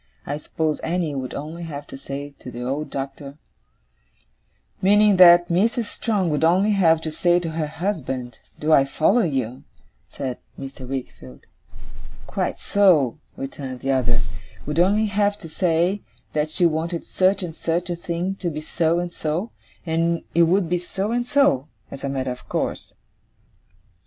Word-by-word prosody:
I 145 - -3
suppose 155 0 -2
Annie 165 -2 -1
would 130 -2 -4
only 155 +4 -6
have 145 -4 -6
to - - -10
say 140 +1 -6
to - - -9
the 120 0 -6
old 140 +5 -2
Doctor 140 +1 -6 0.7
' - - -42
'Meaning 205 +1 +5
that 175 -1 +8
Mrs. 225 +7 +2
Strong 205 -4 -1
would 150 +1 0
only 185 +6 +4
have 165 -5 +4
to 160 - -4
say 175 +3 +3
to 165 -2 -4
her 160 -1 -2
husband 135 - -3 0.2
do 155 +1 +2
I 135 - +7
follow 160 - +2
you?' 130 - -1 0.5
said 130 -3 -5 0.2
Mr. 135 -1 -8
Wickfield. 65 - -7 0.8
'Quite - - -2
so,' 160 - +3 0.2
returned 135 -2 -6
the 135 - 0
other, 125 -2 +2 0.2
' - - -21
would 150 +2 -1
only 205 +5 +4
have 205 0 +1
to 185 - -10
say, 175 +4 +1 0.3
that 150 0 0
she 175 +3 +2
wanted 165 +1 0
such 190 +1 +2
and 165 -3 -5
such 175 +2 -1
a - - -1
thing 170 +2 -2
to 180 - -2
be 155 -2 -4
so 165 +1 0
and 175 0 -3
so; 165 +9 -2 0.3
and 165 0 0
it 170 0 +5
would 185 0 +3
be 175 +1 0
so 195 +4 -3
and 240 +1 0
so, 250 - +3 0.2
as 140 - -8
a 140 - -1
matter 130 -1 -2
of 125 - -9
course. - - -3
165 Hz, 170 wpm, -23 LUFS, 140-180 Hz, 0.8 s, that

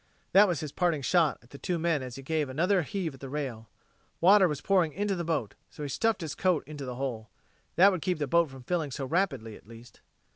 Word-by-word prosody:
That 205 +2 +7
was 175 -6 -1
his 150 -3 -5
parting 170 -5 0
shot 165 -1 +3
at 120 - -23
the 140 - -10
two 180 - -2
men 165 -3 0
as 125 -2 -7
he 135 - -9
gave 155 0 -1
another 180 +8 +2
heave 170 0 -3
at 135 - -14
the 135 - -8
rail. 130 -6 -5 0.5
Water 190 +2 +6
was 150 -4 -3
pouring 175 -3 +2
into 205 +1 -1
the 175 - -3
boat, 155 -10 -2 0.2
so 150 - -9
he 145 - -4
stuffed 225 - 0
his 160 -3 -4
coat 180 -4 +1
into 145 -2 -7
the 125 -1 -5
hole. 120 -5 -4 0.5
That 195 +3 +7
would 185 -4 -3
keep 180 +1 0
the 150 - -1
boat 170 +3 +2
from 135 -1 -12
filling 165 -1 -1
so 135 +1 -4
rapidly, 135 - -1
at - - -17
least. 115 +1 -14
155 Hz, 245 wpm, -29 LUFS, 135-180 Hz, 0.5 s, That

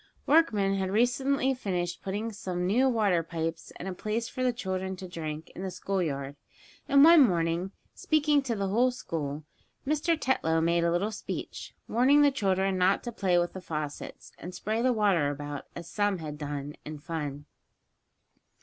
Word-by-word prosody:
Workmen 215 -11 +3
had 190 -1 -1
recently 260 +5 +2
finished 180 -8 -3
putting 205 +4 -3
some 180 -3 -3
new 245 +8 +3
water 205 -8 +2
pipes, 165 0 -4
and 185 - -7
a 190 - -3
place 215 +5 -2
for 255 - -6
the 255 -1 +3
children 190 -4 -3
to 185 0 -8
drink, 160 -2 -6
in - - -8
the 190 - -3
school 195 +1 -2
yard, 140 -3 -3 0.5
and 280 0 +7
one 330 0 +9
morning, 175 -4 +2 0.2
speaking 300 -2 +2
to 250 -4 -2
the 200 -2 -1
whole 240 +6 +3
school, 155 - -4 0.4
Mr. 310 +3 +1
Tetlow 165 - +1
made 170 +1 +2
a 170 - +2
little 190 +5 0
speech, 210 - -6
warning 270 +5 +4
the 285 - +5
children 195 -5 0
not 185 +2 +3
to 240 - -4
play 190 -5 +1
with 175 0 0
the 185 - -7
faucets, 150 -4 -6
and 180 +1 -8
spray 220 +2 -1
the 255 +1 +3
water 200 -10 +2
about, 145 0 -6
as 170 -1 -7
some 205 +1 0
had 155 -3 -6
done, 145 -1 -4
in 155 0 -7
fun. 145 -2 -5
190 Hz, 175 wpm, -28 LUFS, 165-235 Hz, 0.5 s, one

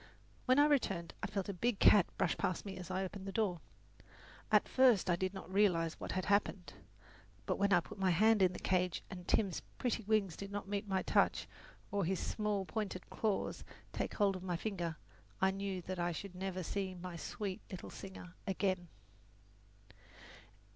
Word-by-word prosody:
When 255 +1 +5
I 290 - +7
returned 200 - +1
I - - -1
felt 200 -2 -3
a 200 - -2
big 230 +4 0
cat 200 -2 +7
brush 180 - +2
past 185 - -1
me 195 - -5
as 180 0 -8
I 185 +1 -1
opened 190 +1 -6
the - - -3
door. 190 -6 0 0.9
At - - +5
first 245 -9 +5
I - - +4
did 185 +1 -1
not 190 -1 -9
realize 175 -5 +3
what - - -4
had 185 -1 -1
happened; 195 -5 +1 0.7
but - - -1
when 200 0 +3
I 175 -2 +6
put - - -11
my 190 -1 +3
hand 210 +4 +5
in 185 -1 +5
the - - -5
cage 180 -1 0
and 180 -2 -8
Tim's 195 -6 +1 0.2
pretty 240 -2 0
wings 205 -5 +2
did 200 0 -7
not 205 -1 -4
meet 205 +1 -2
my 190 -1 0
touch - - +2 0.4
or 200 -1 +1
his 185 +2 0
small 210 -3 -1
pointed 200 -3 -4
claws 215 -3 -1 0.3
take - - -2
hold 200 -2 +3
of 185 - -6
my 180 -2 -2
finger, 175 -5 -3 0.4
I 190 0 +4
knew 195 -2 -3
that 185 +1 -4
I 175 0 +1
should 195 +3 -6
never 185 0 -3
see 190 +1 -2
my 180 0 -7
sweet 190 +3 -4
little 185 -3 -7
singer 190 -2 -9
again. 185 -2 0
190 Hz, 190 wpm, -35 LUFS, 180-205 Hz, 0.9 s, I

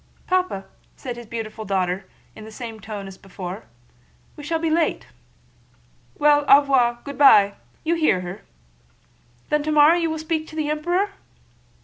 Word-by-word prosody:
"Papa," 365 - -1 0.3
said 245 -2 -6
his 240 -1 -10
beautiful 220 -1 -6
daughter 190 -1 -2 0.3
in 215 - -11
the 220 - -11
same 225 -1 -8
tone 205 -1 -7
as 195 -1 -11
before, 185 - -8 0.7
"we 295 - -10
shall 325 +3 -1
be 320 0 -1
late." 325 0 0 1.1
"Well, 295 0 +4
au 280 +1 +8
revoir! 250 -4 +2
Good 280 -1 -8
by! 205 -8 +7 0.3
You 330 - +1
hear 310 - +2
her?" 180 +2 -7 1.1
"Then 300 0 +2
tomorrow 305 +1 +5
you 335 -1 0
will 315 - -3
speak 315 0 -3
to 315 - -12
the 305 -1 -1
Emperor?" 350 +6 0
275 Hz, 155 wpm, -22 LUFS, 210-315 Hz, 1.1 s, au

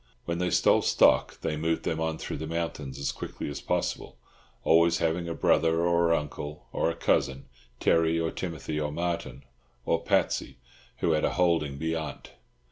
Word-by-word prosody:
When 85 0 -2
they 90 0 +1
stole - - +4
stock, - - +3
they 75 - -1
moved 80 +2 -1
them 80 - -1
on 80 0 -1
through - - -5
the 80 - -5
mountains 80 -5 -4
as 70 - -1
quickly - - -6
as 70 - -6
possible, - - -2 0.5
always 85 +1 +4
having 85 +1 -1
a 85 - -3
brother 80 0 +3
or 85 -1 +3
uncle, 75 -1 -3
or - - +1
a 85 - -3
cousin—Terry 65 +5 0
or 80 0 -1
Timothy 80 -3 -4
or 75 -1 -2
Martin 75 -5 -3 0.4
or - - +1
Patsy—who 65 +5 -2
had 80 -1 +1
a - - +1
holding 85 -6 +1
"beyant." 80 +1 -4
80 Hz, 160 wpm, -28 LUFS, 75-85 Hz, 0.5 s, stole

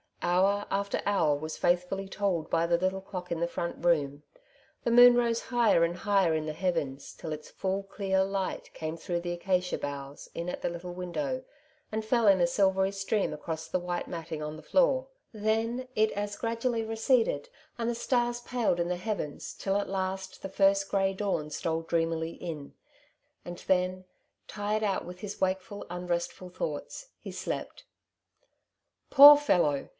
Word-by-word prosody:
Hour 190 +4 +2
after 200 0 -1
hour 170 -8 +3
was 155 +2 -5
faithfully 180 +2 0
told 190 -5 -1
by 165 - +2
the 170 0 +3
little 185 +2 -1
clock 180 -2 -7
in 170 - -1
the 170 - +1
front 170 0 -4
room; 145 -4 +2 0.6
the 235 - +1
moon 245 +1 +9
rose 235 -1 +2
higher 235 -8 +3
and 170 +1 +1
higher 195 -2 +2
in 155 -1 -1
the 155 - -2
heavens, 155 -6 -2
till 155 - -6
its 150 0 -8
full 195 +1 -2
clear 195 -1 0
light 195 -1 -3
came 160 +1 -4
through 175 +1 -2
the 175 0 -3
acacia 180 +1 0
boughs 140 0 -6
in 170 - -4
at - - -5
the - - 0
little 175 +1 -6
window, 255 +10 -3 0.5
and 220 0 -2
fell 230 0 +2
in 195 -2 +6
a - - +6
silvery 190 +1 +2
stream 195 0 -1
across 160 +1 -5
the 185 - -1
white 175 0 -3
matting 165 -2 -5
on 150 +1 -5
the - - -12
floor; - - +2 0.3
then 225 +4 -1
it 215 0 +3
as 205 0 -3
gradually 230 0 -1
receded, 225 - +1 0.3
and 230 0 0
the 240 - -1
stars 240 0 0
paled 240 -8 0
in 170 0 0
the 180 - 0
heavens, 185 -6 -4
tUl 195 0 -2
at 205 - +3
Temptation, - - -9
115 190 0 -2
last - - -16
the 195 - -5
first 195 0 +3
grey 195 -1 +1
dawn 190 -6 -2
stole 160 +2 -2
dreamily 165 0 -1
in; 155 -5 -7 0.7
and 175 0 -6
then, 185 0 +1 0.4
tired 210 +1 -2
out 195 -3 0
with 180 +1 -9
his 205 0 -7
wakeful, 190 +2 -1
unrestful 175 +1 -3
thoughts, 180 - -5
he - - -7
slept. - - -5 1.3
Poor 290 +1 +12
fellow 170 - +1
190 Hz, 175 wpm, -29 LUFS, 170-210 Hz, 1.3 s, Poor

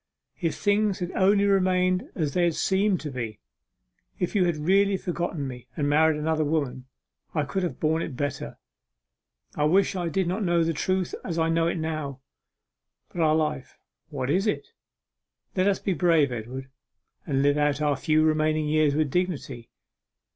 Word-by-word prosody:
If 165 -3 -1
things 205 -1 +1
had 180 -1 -4
only 200 +1 +3
remained 185 -2 +2
as 150 -5 -1
they 175 -1 +3
seemed 190 +3 +1
to 150 - -5
be, 115 -5 -5 0.8
if 180 - -2
you 195 -4 +3
had 170 -3 0
really 195 +5 +3
forgotten 170 -5 -3
me 125 -2 -9
and 145 -2 0
married 155 +1 +3
another 155 +1 0
woman, 140 -4 -2 0.5
I 150 - +2
could 190 +7 -2
have 180 - -3
borne 160 +1 +1
it 145 - -5
better. 145 -1 -4 1.0
I 150 - 0
wish 190 +5 +3
I 175 -2 -1
did 185 +2 0
not 190 +5 -1
know 170 -2 +2
the 165 0 0
truth 185 +4 -1
as 170 -2 -4
I 165 0 +2
know 165 0 +2
it 170 - -1
now! 155 -4 -4 0.9
But 175 - -4
our 155 -1 +4
life, 150 -4 -2 0.3
what 135 -2 -2
is 190 +6 +1
it? 210 - -2 0.9
Let 185 0 +2
us 200 -1 +3
be 195 - -1
brave, 165 -6 +3
Edward, 125 +3 -6 0.6
and 135 -3 +1
live 145 +1 +3
out 145 -1 +1
our 150 -1 +1
few 155 +3 +2
remaining 155 0 +1
years 150 -1 +2
with 150 -3 +1
dignity. 145 -9 -2
160 Hz, 175 wpm, -26 LUFS, 145-180 Hz, 1.0 s, our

